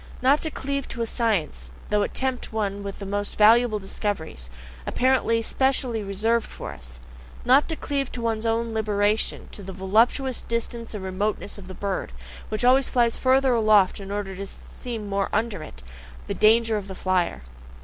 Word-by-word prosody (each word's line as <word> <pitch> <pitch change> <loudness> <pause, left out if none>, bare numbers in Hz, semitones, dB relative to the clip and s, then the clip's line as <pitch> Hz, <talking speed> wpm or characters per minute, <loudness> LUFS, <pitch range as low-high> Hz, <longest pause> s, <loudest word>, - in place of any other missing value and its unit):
Not 275 +4 +4
to 320 - -1
cleave 280 -2 -3
to 235 - -3
a - - 0
science, 195 - -1 0.2
though 210 0 +3
it - - -2
tempt 260 -1 -2
one 205 -2 -2
with 200 -1 -6
the 200 - -7
most 205 +1 -3
valuable 225 +1 +6
discoveries, 190 - -4 0.4
apparently 250 -3 +2
specially 260 -3 +1
reserved 215 +4 0
for - - -7
us. 65 0 -12 0.5
Not 265 +6 +5
to 320 - -1
cleave 280 -3 -2
to 240 - -5
one's 225 0 -1
own 230 0 0
liberation, 210 -1 0
to - - -9
the 190 0 -7
voluptuous 225 +7 +2
distance 230 -1 -3
and 200 - -5
remoteness 205 +2 -2
of 185 - -11
the 185 - -8
bird, 195 - -3 0.4
which 215 +3 -1
always 260 +2 +5
flies 235 -2 +2
further 260 0 +3
aloft 215 -5 +4
in 195 -1 -8
order 200 -1 -3
always 195 +1 -6
to - - -17
see 245 -2 -4
more 200 -2 -2
under 215 -4 -1
it 65 - -10 0.4
the - - -3
danger 225 0 +4
of 200 -2 -5
the 190 - -7
flier. 180 - 0
215 Hz, 180 wpm, -25 LUFS, 195-240 Hz, 0.5 s, valuable